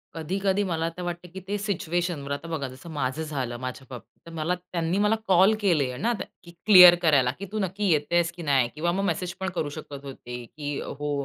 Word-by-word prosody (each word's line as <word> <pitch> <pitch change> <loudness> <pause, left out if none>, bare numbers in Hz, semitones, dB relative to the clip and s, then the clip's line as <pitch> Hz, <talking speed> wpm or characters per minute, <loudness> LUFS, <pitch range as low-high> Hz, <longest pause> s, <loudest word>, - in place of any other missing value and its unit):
कधी-कधी 190 +5 0
मला 165 -4 -1
आता 165 +2 -5
वाटतं, 175 0 -5
की 190 - -6
ते 205 +1 -1
सिच्युएशनवर. 175 -7 -2
आता 145 +3 -4
बघा 155 -5 -3
जसं 130 +7 -11
माझं 145 +1 -2
झालं 130 -6 -4
माझ्या 130 +1 -6
बाबतीत, 125 -2 -11
तर 165 - -11
मला 165 +3 0
त्यांनी 175 -1 -3
मला 210 +2 +3
कॉल 190 +3 +5
केले 150 -10 +1
ना, 235 - 0 0.3
की 170 - -13
क्लिअर 180 -4 +10
करायला, 140 -7 +4
की 200 - -5
तू 215 - -2
नक्की 195 +1 -1
येतेस 170 +3 +2
की 175 - -8
नाही? 135 -5 +2
किंवा 170 +3 0
मग 195 +3 -1
मेसेज 175 -1 -2
पण 190 0 -2
करू 150 - -1
शकत 145 -3 -8
होते, 125 -3 -8
की 145 +1 -5
हो. 145 +1 -4
165 Hz, 210 wpm, -26 LUFS, 145-185 Hz, 0.3 s, क्लिअर